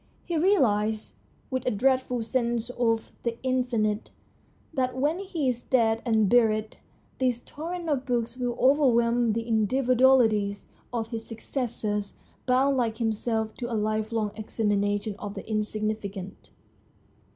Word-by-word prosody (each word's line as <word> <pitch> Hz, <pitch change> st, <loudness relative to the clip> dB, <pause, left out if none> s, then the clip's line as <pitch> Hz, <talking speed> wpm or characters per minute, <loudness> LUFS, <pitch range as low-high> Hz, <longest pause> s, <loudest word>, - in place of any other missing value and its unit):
He 345 Hz, -, -2 dB
realises, 220 Hz, -, +2 dB, 0.4 s
with 260 Hz, -1 st, -1 dB
a -, -, +5 dB
dreadful 250 Hz, +1 st, +1 dB
sense 235 Hz, 0 st, -1 dB
of 230 Hz, -2 st, 0 dB
the 235 Hz, -1 st, -3 dB
in 255 Hz, -1 st, +2 dB
finite, 215 Hz, -4 st, -1 dB, 0.6 s
that 255 Hz, -3 st, -1 dB
when 295 Hz, +7 st, +1 dB
he 350 Hz, -8 st, -2 dB
is 245 Hz, -1 st, 0 dB
dead 225 Hz, -3 st, +2 dB
and 220 Hz, -3 st, +3 dB
buried 220 Hz, -1 st, +2 dB, 0.4 s
this 250 Hz, -2 st, +1 dB
torrent 335 Hz, +3 st, -6 dB
of 275 Hz, -4 st, -1 dB
books 240 Hz, -1 st, -1 dB
will 245 Hz, -1 st, -2 dB
overwhelm 240 Hz, -4 st, +4 dB
the 230 Hz, +1 st, -2 dB
individu 240 Hz, +3 st, +1 dB
alities 220 Hz, -6 st, +4 dB, 0.3 s
of 225 Hz, -2 st, -2 dB
his 225 Hz, -1 st, -5 dB
successors, 220 Hz, -3 st, -3 dB, 0.3 s
bound 265 Hz, +2 st, +3 dB
like 230 Hz, -3 st, 0 dB
himself 220 Hz, -1 st, -1 dB
to 240 Hz, -1 st, -4 dB
a 225 Hz, -, 0 dB
lifelong 215 Hz, 0 st, -1 dB
examination 205 Hz, -1 st, -1 dB
of 205 Hz, -1 st, -6 dB
the -, -, -7 dB
insignificant. 215 Hz, -2 st, -3 dB
230 Hz, 135 wpm, -27 LUFS, 215-255 Hz, 0.6 s, a